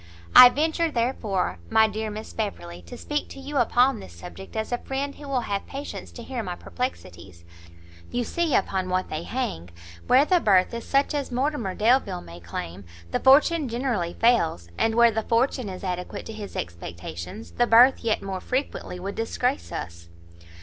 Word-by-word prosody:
"I 250 - +12
venture, 320 +4 0
therefore, 220 - -1
my 220 0 +5
dear 215 +1 -4
Miss 215 +1 -7
Beverley, 90 - -5
to - - -9
speak 295 0 -3
to - - -10
you 280 +2 -5
upon 245 0 +3
this 90 - -11
subject 85 +2 -11
as 220 +2 -3
a 245 - 0
friend 275 +1 -3
who 290 - -11
will 265 -3 0
have 200 -3 -3
patience 280 +1 -7
to 235 - -9
hear 250 0 -4
my 180 -4 -5
perplexities; 90 - -6 0.6
you 245 - -1
see 330 +4 0
upon 190 -1 0
what 185 0 -1
they 155 +1 -3
hang, 170 - -4 0.4
where 265 +3 +6
the 360 +2 +3
birth 190 - +3
is 235 0 -5
such 275 +2 +2
as 285 -3 -3
Mortimer 250 -6 -1
Delvile 235 - +2
may 85 0 -11
claim, 85 +2 -7 0.3
the - - 0
fortune 290 +2 +5
generally 235 -8 -2
fails; 170 - +2
and 225 - +1
where 235 0 +6
the 220 0 -1
fortune 235 0 0
is 185 0 -8
adequate 180 -1 -4
to 225 - -7
his 210 -2 -8
expectations, 85 -1 -7
the 240 - +1
birth 245 +4 +7
yet 225 -2 0
more 190 -1 -4
frequently 255 -8 -3
would 195 +2 -5
disgrace 250 +4 -2
us." 85 0 -7
225 Hz, 180 wpm, -25 LUFS, 175-260 Hz, 0.6 s, I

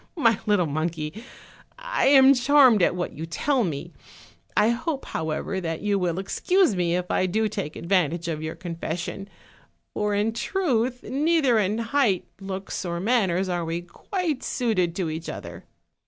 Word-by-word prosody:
My 230 -8 +3
little 205 -4 +3
monkey, 155 +5 -3 0.5
I - - 0
am 270 -1 +8
charmed 260 -4 +5
at 175 - +3
what 180 - -3
you 160 +2 -6
tell 265 - 0
me; 170 -1 -4 0.6
I 215 - +5
hope, 270 +5 -2
however, 160 +4 -3
that 165 -2 -3
you 205 -1 +1
will 175 -2 -1
excuse 345 - +2
me 175 -1 +1
if 180 0 -2
I 185 - +2
do 220 +4 +1
take 155 -7 -5
advantage 170 -2 0
of 155 -2 -3
your 155 +1 -4
confession; 175 +3 -5 0.6
for 210 -1 0
in 210 +2 +1
truth, 250 - -1
neither 280 -2 +2
in 205 +1 0
height, 230 -5 +1
looks, 195 0 -5
or 170 -1 -3
manners 195 -4 +1
are 175 -2 -1
we 165 +1 -3
quite 320 - -3
suited 185 -9 0
to 175 -4 -2
each 160 +1 -5
other." - - -8
195 Hz, 160 wpm, -25 LUFS, 170-245 Hz, 0.6 s, am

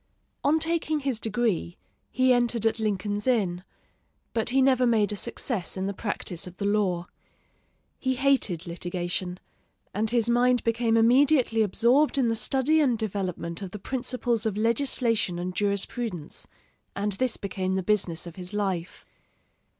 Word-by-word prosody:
On 300 +3 +3
taking 320 -1 0
his 265 -5 -1
degree 215 -6 -1 0.3
he 255 0 +3
entered 240 -2 +1
at 225 +1 +1
Lincoln's 205 0 -2
Inn, 190 -8 +1 0.7
but 225 0 0
he 265 +2 +2
never 260 -2 +4
made 215 -3 +2
a - - -2
success 220 -3 -1
in 190 - -2
the 200 - -2
practice 190 -4 -4
of 180 0 -11
the 200 - -3
law. 195 -4 +1 0.9
He 260 0 0
hated 255 - +1
litigation, 175 +1 -3 0.5
and 215 +2 +1
his 235 -1 +2
mind 245 0 +3
became 230 0 +1
immediately 245 0 +4
absorbed 240 +9 +3
in 250 -4 +2
the 225 - 0
study 270 +7 +2
and 250 -6 +2
development 185 -5 -3
of 195 - -5
the 210 - -7
principles 245 0 -1
of 205 -2 -3
legislation 230 -4 +1
and 180 +1 -4
jurisprudence, 200 -2 -2 0.5
and 205 +1 -1
this 235 +4 0
became 190 -1 -3
the 190 - -1
business 180 -4 +1
of 170 0 -10
his 180 +2 -5
life. 190 -4 -3
220 Hz, 150 wpm, -26 LUFS, 190-245 Hz, 0.9 s, never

